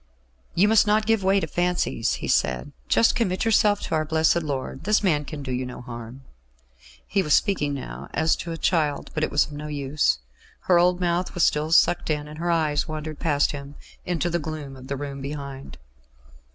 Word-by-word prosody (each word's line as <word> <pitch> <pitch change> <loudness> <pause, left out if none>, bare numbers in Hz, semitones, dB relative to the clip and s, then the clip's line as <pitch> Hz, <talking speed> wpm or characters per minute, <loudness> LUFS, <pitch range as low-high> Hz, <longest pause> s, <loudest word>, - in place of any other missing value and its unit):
"You 195 +4 +4
must 220 0 +5
not 215 +1 +3
give 225 -2 +2
way 195 +1 +4
to 185 - -2
fancies," 175 -8 0
he - - -4
said. 65 0 0 0.2
"Just 230 - +4
commit 200 -4 0
yourself 210 -2 +3
to - - -4
our 155 -1 +2
Blessed 160 +2 +2
Lord. 135 -3 -4
This 210 +1 +3
man 150 -6 +2
can 145 -1 -7
do 130 - -5
you 125 +1 -1
no 125 -1 -7
harm." 120 +1 -9 0.8
He 195 - +1
was 150 -5 +3
speaking 150 -9 +1
now 70 - -7
as 160 - +2
to 170 - -5
a 165 - -4
child; 150 -4 0
but 155 - -1
it - - +1
was 145 - +3
of - - -13
no 150 +1 -6
use. 145 - 0 0.4
Her 175 -2 +4
old 180 +1 +3
mouth 175 0 -1
was 175 - +2
still 150 +1 0
sucked 170 0 +4
in, 150 -1 -1
and 150 +1 -10
her 175 +1 -1
eyes 155 -3 +1
wandered 155 -1 -5
past 145 -3 +2
him 140 0 -8 0.3
into 175 -1 -1
the 170 - 0
gloom 150 -3 -6
of 130 0 -12
the 140 0 -3
room 140 -1 -6
behind. 140 - -7
155 Hz, 205 wpm, -24 LUFS, 140-175 Hz, 0.8 s, must